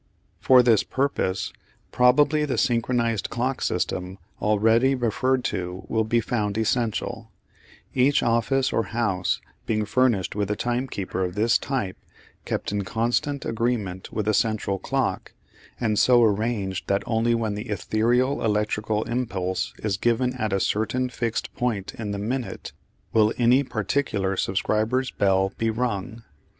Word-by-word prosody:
For 130 Hz, -1 st, +6 dB
this 115 Hz, -4 st, +4 dB
purpose 115 Hz, -9 st, -1 dB, 0.4 s
probably 145 Hz, +5 st, +4 dB
the 145 Hz, -3 st, -1 dB
synchronised 115 Hz, -3 st, +1 dB
clock 125 Hz, +2 st, -2 dB
system 90 Hz, +1 st, -2 dB, 0.2 s
already 110 Hz, +5 st, +3 dB
referred 125 Hz, +2 st, 0 dB
to 90 Hz, +1 st, -4 dB
will 110 Hz, -1 st, +1 dB
be 115 Hz, +2 st, +2 dB
found 105 Hz, -3 st, -2 dB
essential, 110 Hz, -3 st, -1 dB, 0.6 s
each 135 Hz, +2 st, +3 dB
office 120 Hz, +3 st, +1 dB
or 115 Hz, -, +1 dB
house 95 Hz, -6 st, 0 dB, 0.3 s
being 110 Hz, -1 st, 0 dB
furnished 110 Hz, -6 st, +1 dB
with 105 Hz, -1 st, -1 dB
a 105 Hz, -, 0 dB
timekeeper 120 Hz, -6 st, -2 dB
of 90 Hz, 0 st, -3 dB
this 110 Hz, +2 st, +3 dB
type 115 Hz, -9 st, -3 dB, 0.5 s
kept -, -, -3 dB
in 100 Hz, -1 st, -1 dB
constant 120 Hz, +7 st, -1 dB
agreement 110 Hz, -5 st, -2 dB
with 105 Hz, -1 st, -3 dB
a 110 Hz, -, +3 dB
central 105 Hz, -3 st, 0 dB
clock, -, -, -2 dB, 0.5 s
and 110 Hz, -4 st, +1 dB
so 120 Hz, -2 st, +5 dB
arranged 105 Hz, -3 st, 0 dB
that 100 Hz, 0 st, +1 dB
only 115 Hz, +1 st, +1 dB
when 110 Hz, -2 st, -1 dB
the 105 Hz, +3 st, -6 dB
ethereal 120 Hz, +6 st, +1 dB
electrical 105 Hz, 0 st, 0 dB
impulse 100 Hz, -7 st, -2 dB
is 105 Hz, -3 st, 0 dB
given 120 Hz, +3 st, +1 dB
at 110 Hz, -5 st, -2 dB
a 95 Hz, -, +1 dB
certain 125 Hz, +6 st, 0 dB
fixed 115 Hz, -2 st, -3 dB
point 115 Hz, -6 st, -2 dB
in 110 Hz, -2 st, -5 dB
the 100 Hz, -, -2 dB
minute, 120 Hz, +5 st, -4 dB, 0.4 s
will 110 Hz, -1 st, +4 dB
any 125 Hz, +3 st, +4 dB
particular 110 Hz, -5 st, -1 dB
subscriber's 110 Hz, +7 st, 0 dB
bell 95 Hz, 0 st, +1 dB
be 115 Hz, -, +1 dB
rung. 115 Hz, -1 st, -3 dB
110 Hz, 140 wpm, -24 LUFS, 105-125 Hz, 0.6 s, For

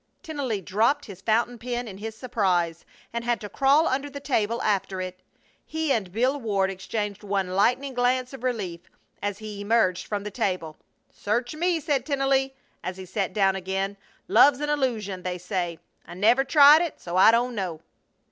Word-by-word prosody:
Tennelly 280 Hz, -, -3 dB
dropped 225 Hz, -, +1 dB
his 195 Hz, -4 st, -11 dB
fountain 235 Hz, +3 st, +1 dB
pen 245 Hz, +1 st, -3 dB
in 195 Hz, -2 st, -9 dB
his 220 Hz, +1 st, -6 dB
surprise, 185 Hz, -9 st, 0 dB, 0.3 s
and 235 Hz, 0 st, -2 dB
had 240 Hz, 0 st, 0 dB
to 210 Hz, -, -5 dB
crawl 280 Hz, +7 st, +3 dB
under 275 Hz, +2 st, -1 dB
the 280 Hz, 0 st, -7 dB
table 235 Hz, -5 st, 0 dB
after 195 Hz, -2 st, 0 dB
it. 185 Hz, 0 st, -5 dB, 0.4 s
He 315 Hz, -2 st, -2 dB
and 195 Hz, -6 st, -2 dB
Bill 255 Hz, +7 st, +1 dB
Ward 200 Hz, -4 st, 0 dB
exchanged 205 Hz, +1 st, -4 dB
one 195 Hz, -2 st, -1 dB
lightning 250 Hz, +9 st, +1 dB
glance 250 Hz, +1 st, +1 dB
of 270 Hz, -, -9 dB
relief 200 Hz, -9 st, -2 dB, 0.4 s
as 205 Hz, -1 st, -2 dB
he 210 Hz, -1 st, -7 dB
emerged 205 Hz, -4 st, +1 dB
from 205 Hz, -1 st, -3 dB
the 210 Hz, -, -5 dB
table. 185 Hz, -8 st, -2 dB, 0.3 s
"Search 240 Hz, +5 st, -2 dB
me!" 340 Hz, +2 st, 0 dB
said 280 Hz, -4 st, 0 dB
Tennelly, 270 Hz, -1 st, +1 dB, 0.3 s
as 185 Hz, +1 st, -4 dB
he 190 Hz, -, -8 dB
sat 190 Hz, +1 st, -2 dB
down 195 Hz, -2 st, +2 dB
again. 190 Hz, +1 st, -2 dB, 0.3 s
"Love's 280 Hz, -2 st, +6 dB
an 295 Hz, 0 st, -2 dB
illusion, 225 Hz, -10 st, -1 dB
they 180 Hz, 0 st, -3 dB
say. 180 Hz, -2 st, -3 dB, 0.3 s
I 175 Hz, -, -11 dB
never 230 Hz, +8 st, +4 dB
tried 290 Hz, +2 st, +7 dB
it, 345 Hz, -3 st, -3 dB
so 175 Hz, 0 st, -6 dB
I 185 Hz, -, +7 dB
don't 240 Hz, +2 st, +2 dB
know." 185 Hz, -7 st, -4 dB
220 Hz, 180 wpm, -25 LUFS, 190-260 Hz, 0.4 s, tried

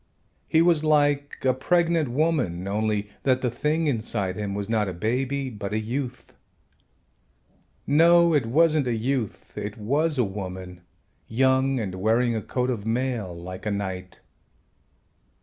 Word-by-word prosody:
He 160 Hz, +1 st, +4 dB
was 170 Hz, -3 st, +3 dB
like 145 Hz, -2 st, +2 dB
a 130 Hz, -, +4 dB
pregnant 165 Hz, +2 st, +1 dB
woman, 125 Hz, -, 0 dB
only 105 Hz, 0 st, -1 dB
that 130 Hz, -1 st, +2 dB
the 125 Hz, -, 0 dB
thing 150 Hz, +6 st, 0 dB
inside 110 Hz, -8 st, -1 dB
him 100 Hz, -1 st, -3 dB
was 100 Hz, -1 st, -3 dB
not 110 Hz, -2 st, +1 dB
a 95 Hz, -, -3 dB
baby 130 Hz, +8 st, -1 dB
but 100 Hz, -2 st, -5 dB
a 110 Hz, -, +1 dB
youth. 125 Hz, +3 st, -5 dB, 1.5 s
No, 170 Hz, +3 st, +5 dB
it 140 Hz, -7 st, +2 dB
wasn't 155 Hz, +2 st, +3 dB
a 120 Hz, -, 0 dB
youth, 120 Hz, -1 st, -3 dB
it 105 Hz, +1 st, -5 dB
was 145 Hz, +8 st, 0 dB
a 125 Hz, -, +3 dB
woman, 95 Hz, -3 st, -6 dB, 0.5 s
young, 130 Hz, +2 st, +2 dB
and 100 Hz, -5 st, -3 dB
wearing 115 Hz, +5 st, +1 dB
a 110 Hz, -, -1 dB
coat 125 Hz, +5 st, -1 dB
of 110 Hz, -5 st, -4 dB
mail 115 Hz, -3 st, -1 dB
like 90 Hz, +4 st, -7 dB
a -, -, 0 dB
knight. 95 Hz, -2 st, -5 dB
120 Hz, 150 wpm, -25 LUFS, 105-145 Hz, 1.5 s, No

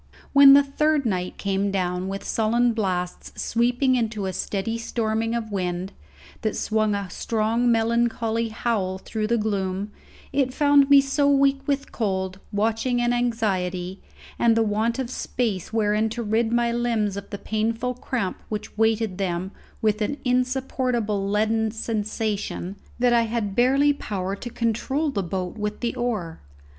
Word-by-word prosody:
When 280 Hz, -1 st, +9 dB
the 285 Hz, 0 st, +7 dB
third 295 Hz, +1 st, +1 dB
night 185 Hz, -4 st, -2 dB
came 200 Hz, 0 st, 0 dB
down 180 Hz, -1 st, -1 dB
with 195 Hz, +1 st, -4 dB
sullen 235 Hz, +2 st, +2 dB
blasts 185 Hz, -5 st, -3 dB
sweeping 245 Hz, +3 st, +2 dB
into 220 Hz, -4 st, -1 dB
a 190 Hz, -, -2 dB
steady 215 Hz, +5 st, -2 dB
storming 225 Hz, 0 st, -1 dB
of 225 Hz, -2 st, -3 dB
wind, 180 Hz, -1 st, -2 dB, 0.5 s
that 215 Hz, -, -1 dB
swung 215 Hz, -1 st, +1 dB
a 200 Hz, -1 st, -3 dB
strong 230 Hz, +4 st, +1 dB
melancholy 230 Hz, 0 st, +1 dB
howl 215 Hz, -4 st, -1 dB
through 215 Hz, +2 st, -3 dB
the 235 Hz, +1 st, +2 dB
gloom, 200 Hz, -2 st, -2 dB, 0.4 s
it 260 Hz, -2 st, +1 dB
found 285 Hz, -1 st, +5 dB
me 280 Hz, -1 st, +8 dB
so 280 Hz, +1 st, +1 dB
weak 275 Hz, -1 st, +3 dB
with 280 Hz, -1 st, -1 dB
cold, 190 Hz, -3 st, -2 dB
watching, 225 Hz, +4 st, 0 dB
and 240 Hz, 0 st, +2 dB
anxiety, 190 Hz, -6 st, -1 dB, 0.4 s
and 230 Hz, -1 st, +4 dB
the 225 Hz, -, +4 dB
want 220 Hz, +3 st, 0 dB
of 260 Hz, -2 st, -3 dB
space 220 Hz, -9 st, -2 dB
wherein 215 Hz, 0 st, +1 dB
to 235 Hz, +2 st, -4 dB
rid 220 Hz, +1 st, +1 dB
my 235 Hz, 0 st, +2 dB
limbs 230 Hz, -4 st, 0 dB
of 200 Hz, 0 st, -7 dB
the 200 Hz, -, -5 dB
painful 225 Hz, +4 st, -1 dB
cramp 245 Hz, -5 st, -3 dB
which 210 Hz, -1 st, -5 dB
weighted 220 Hz, -3 st, +1 dB
them 185 Hz, 0 st, -2 dB, 0.3 s
with 215 Hz, 0 st, +2 dB
an 285 Hz, +7 st, -1 dB
insupportable 250 Hz, -5 st, 0 dB
leaden 220 Hz, +2 st, +1 dB
sensation, 215 Hz, -3 st, -3 dB, 0.2 s
that 245 Hz, 0 st, +3 dB
I 235 Hz, -, +5 dB
had 215 Hz, -4 st, -2 dB
barely 275 Hz, +4 st, +4 dB
power 195 Hz, -7 st, -3 dB
to 240 Hz, -, -7 dB
control 240 Hz, +7 st, -1 dB
the 205 Hz, -, -1 dB
boat 185 Hz, +3 st, -4 dB
with 210 Hz, 0 st, -3 dB
the 235 Hz, -1 st, -1 dB
oar. 210 Hz, -10 st, -2 dB
225 Hz, 155 wpm, -24 LUFS, 200-240 Hz, 0.5 s, When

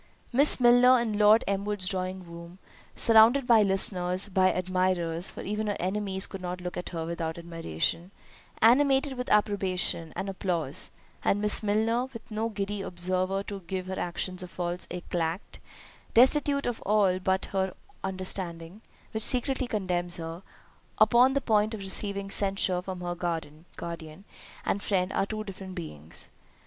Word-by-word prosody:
Miss 280 Hz, +3 st, +7 dB
Milner 245 Hz, +1 st, +6 dB
in 220 Hz, -3 st, -2 dB
Lord 210 Hz, +2 st, +6 dB
Elmwood's 200 Hz, -1 st, -2 dB
drawing 185 Hz, -1 st, -3 dB
room, 170 Hz, +1 st, -11 dB, 0.4 s
surrounded 230 Hz, +4 st, +5 dB
by 230 Hz, -3 st, +6 dB
listeners, 190 Hz, -1 st, +1 dB
by 185 Hz, -1 st, +3 dB
admirers, 185 Hz, -2 st, 0 dB
(for -, -, -8 dB
even 210 Hz, +2 st, -3 dB
her 205 Hz, -, -1 dB
enemies 190 Hz, +1 st, -1 dB
could 195 Hz, -, -8 dB
not 180 Hz, 0 st, -4 dB
look 180 Hz, +1 st, -6 dB
at 180 Hz, -, -5 dB
her 165 Hz, -2 st, -4 dB
without 165 Hz, -1 st, -4 dB
admiration) 165 Hz, -, -3 dB, 0.5 s
animated 270 Hz, +3 st, +4 dB
with 250 Hz, -1 st, -5 dB
approbation 190 Hz, -5 st, +1 dB
and 195 Hz, -, -4 dB
applause—and 185 Hz, +1 st, -2 dB
Miss 210 Hz, 0 st, +4 dB
Milner, 220 Hz, +4 st, +1 dB
with 230 Hz, -1 st, -11 dB
no 220 Hz, +2 st, -1 dB
giddy 205 Hz, -1 st, -4 dB
observer 185 Hz, +2 st, -1 dB
to 200 Hz, -1 st, -6 dB
give 185 Hz, 0 st, -3 dB
her 190 Hz, 0 st, -5 dB
actions 180 Hz, +1 st, -3 dB
a 180 Hz, -, -6 dB
false 175 Hz, 0 st, -4 dB
éclat, 175 Hz, 0 st, -4 dB, 0.6 s
destitute 280 Hz, +3 st, +4 dB
of 245 Hz, -2 st, -3 dB
all 195 Hz, -3 st, +2 dB
but 190 Hz, 0 st, 0 dB
her 190 Hz, -1 st, +2 dB
own 185 Hz, -, -10 dB, 0.3 s
understanding, 185 Hz, -1 st, -3 dB, 0.3 s
(which 220 Hz, -, -3 dB
secretly 255 Hz, +2 st, +1 dB
condemns 180 Hz, -5 st, 0 dB
her) 165 Hz, +1 st, -6 dB, 0.6 s
upon 240 Hz, +5 st, +5 dB
the 280 Hz, -, +1 dB
point 215 Hz, -1 st, +1 dB
of -, -, -8 dB
receiving 195 Hz, 0 st, -3 dB
censure 195 Hz, -3 st, 0 dB
from 185 Hz, -1 st, -7 dB
her 175 Hz, 0 st, -3 dB
guardian 165 Hz, 0 st, -6 dB, 0.4 s
and 200 Hz, -, -1 dB
friend, 190 Hz, -2 st, 0 dB
are 195 Hz, -, 0 dB
two 215 Hz, 0 st, -4 dB
different 190 Hz, -2 st, -9 dB
beings. 80 Hz, -, -7 dB
190 Hz, 150 wpm, -28 LUFS, 180-215 Hz, 0.6 s, Miss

